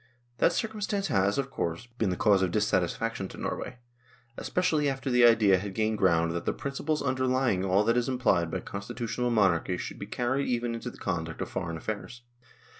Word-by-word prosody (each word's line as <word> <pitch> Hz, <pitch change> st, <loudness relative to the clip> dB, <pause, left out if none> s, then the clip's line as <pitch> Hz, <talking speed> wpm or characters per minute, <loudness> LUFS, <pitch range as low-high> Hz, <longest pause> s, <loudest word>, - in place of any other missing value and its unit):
That -, -, +4 dB
cir 225 Hz, -, -1 dB
cumstance 205 Hz, -3 st, -2 dB
has, 100 Hz, -5 st, +2 dB
of 135 Hz, -1 st, -2 dB
course, 85 Hz, +1 st, -3 dB
been 120 Hz, -4 st, -2 dB
the 90 Hz, -, 0 dB
cause 100 Hz, 0 st, +3 dB
of 95 Hz, -, +2 dB
dis 105 Hz, +4 st, +1 dB
satisfaction 95 Hz, +3 st, -1 dB
to -, -, -11 dB
Norway, -, -, -4 dB, 0.6 s
especially 155 Hz, -4 st, +1 dB
after 135 Hz, 0 st, -3 dB
the 125 Hz, 0 st, +5 dB
idea 110 Hz, -5 st, +6 dB
had 95 Hz, 0 st, -6 dB
gained 110 Hz, -1 st, 0 dB
ground 85 Hz, -3 st, +3 dB
that 85 Hz, 0 st, -4 dB
the -, -, +1 dB
principles 145 Hz, +2 st, -2 dB
underlying 130 Hz, -6 st, +1 dB
all 95 Hz, +2 st, +3 dB
that 115 Hz, +2 st, +2 dB
is 125 Hz, +1 st, +1 dB
implied 110 Hz, -10 st, +2 dB
by -, -, -3 dB
constitutional 115 Hz, +3 st, -3 dB
monarchy 95 Hz, -5 st, +2 dB
should -, -, -6 dB
be -, -, -6 dB
carried 130 Hz, +3 st, -1 dB
even 120 Hz, -1 st, -1 dB
into 115 Hz, +2 st, -5 dB
the -, -, -13 dB
conduct 80 Hz, -2 st, -3 dB
of -, -, -3 dB
foreign 85 Hz, -1 st, -3 dB
affairs. 110 Hz, +6 st, -6 dB
115 Hz, 195 wpm, -28 LUFS, 95-130 Hz, 0.6 s, idea